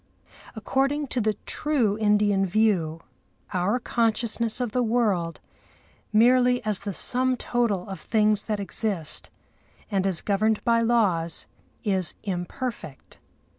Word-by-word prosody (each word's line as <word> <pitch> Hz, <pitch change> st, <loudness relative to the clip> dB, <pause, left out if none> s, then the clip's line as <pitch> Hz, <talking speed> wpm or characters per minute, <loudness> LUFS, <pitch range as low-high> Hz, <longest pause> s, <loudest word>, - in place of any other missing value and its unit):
According 275 Hz, +5 st, -1 dB
to 250 Hz, -, -1 dB
the 215 Hz, -1 st, 0 dB
true 265 Hz, -9 st, +1 dB
Indian 210 Hz, -2 st, +2 dB
view, 185 Hz, -5 st, +1 dB, 0.5 s
our 185 Hz, +5 st, +1 dB
consciousness 230 Hz, 0 st, 0 dB
of 245 Hz, -3 st, -2 dB
the 250 Hz, -, 0 dB
world, 215 Hz, -8 st, 0 dB, 0.7 s
merely 245 Hz, +3 st, +4 dB
as 210 Hz, -3 st, -1 dB
the 200 Hz, 0 st, -5 dB
sum 255 Hz, +6 st, +1 dB
total 230 Hz, -7 st, -1 dB
of 195 Hz, -1 st, -7 dB
things 215 Hz, -2 st, +1 dB
that 210 Hz, -2 st, -2 dB
exist, 195 Hz, -5 st, -2 dB, 0.6 s
and 195 Hz, -1 st, +1 dB
as 185 Hz, -4 st, +3 dB
governed 215 Hz, +2 st, 0 dB
by 230 Hz, -1 st, +3 dB
laws, 200 Hz, -9 st, +1 dB, 0.4 s
is 190 Hz, -6 st, +2 dB
imperfect. 180 Hz, -, -6 dB
215 Hz, 120 wpm, -25 LUFS, 195-235 Hz, 0.7 s, merely